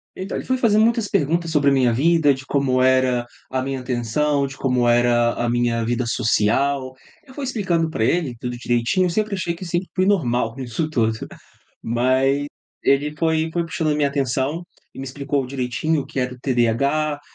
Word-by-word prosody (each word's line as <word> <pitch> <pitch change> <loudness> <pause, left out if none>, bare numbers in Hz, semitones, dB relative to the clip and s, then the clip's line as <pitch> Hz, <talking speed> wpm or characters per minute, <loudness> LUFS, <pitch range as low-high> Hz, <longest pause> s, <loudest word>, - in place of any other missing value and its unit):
Então, 190 +2 -5
ele - - -6
foi 260 0 0
fazendo 220 -3 +3
muitas 230 -2 +2
perguntas 165 +2 0
sobre 145 -2 +3
a - - +3
minha 125 -3 +3
vida, 155 +2 +3
de 130 +1 -9
como 130 -3 +1
era 130 -2 +3 0.2
a 130 0 -1
minha 135 0 -3
atenção, 130 +4 0
de 135 0 -8
como 125 -2 +1
era 120 0 +3
a 120 0 -1
minha 120 -1 0
vida 120 +1 -1
social. 130 +5 +1 0.3
Eu 260 - -15
fui 280 -1 -5
explicando 180 -10 0
pra 110 -8 -2
ele 145 -3 0
tudo 125 0 -4
direitinho, 120 +10 +1
sempre 210 +3 -1
achei 175 -2 -2
que 185 - -9
sempre 175 +2 -2
fui 185 0 +2
normal 125 - +1
nisso 135 +5 -3
tudo. 110 -6 0
Ah, - - -12 0.5
mas 130 +4 +1 0.4
ele 145 +2 +2
foi 160 0 0
foi 170 -1 0
puxando 160 -1 -2
a - - 0
minha 145 -1 +1
atenção 140 +4 -1 0.3
e - - -12
me 135 - -5
explicou 140 0 -2
direitinho 135 +4 -1
o - - -13
que - - -7
era 125 0 -1
o - - -16
TDAH, 140 +5 +1
135 Hz, 195 wpm, -21 LUFS, 125-160 Hz, 0.5 s, fazendo